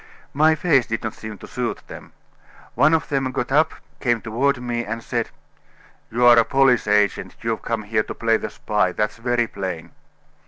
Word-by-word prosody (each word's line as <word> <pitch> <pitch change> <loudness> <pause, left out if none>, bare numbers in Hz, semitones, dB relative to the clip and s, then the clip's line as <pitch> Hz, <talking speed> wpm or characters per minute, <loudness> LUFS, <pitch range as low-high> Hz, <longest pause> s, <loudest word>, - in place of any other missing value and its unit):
My 155 +2 +4
face 145 -6 +2
did 115 -2 -3
not 115 - -3
seem 110 -1 -8
to - - -11
suit - - -4
them. - - -11 0.6
One 145 +6 +4
of 160 - -2
them 135 -3 0
got 125 0 -3
up, 155 +3 +3 0.3
came 120 -3 +1
toward 125 +5 0
me, 120 -1 -3
and 115 +1 -5
said: 120 -2 -2 0.8
'You 120 +2 +1
are 120 -1 +8
a - - +5
police 135 -3 +3
agent; 105 -2 +1
you've 115 -1 -2
come 115 -2 -3
here 110 +1 0
to - - -7
play 115 -1 +2
the - - -5
spy; 105 -4 -1
that's 105 +4 -1
very 120 0 0
plain. 95 -6 -6
115 Hz, 190 wpm, -22 LUFS, 110-135 Hz, 0.8 s, are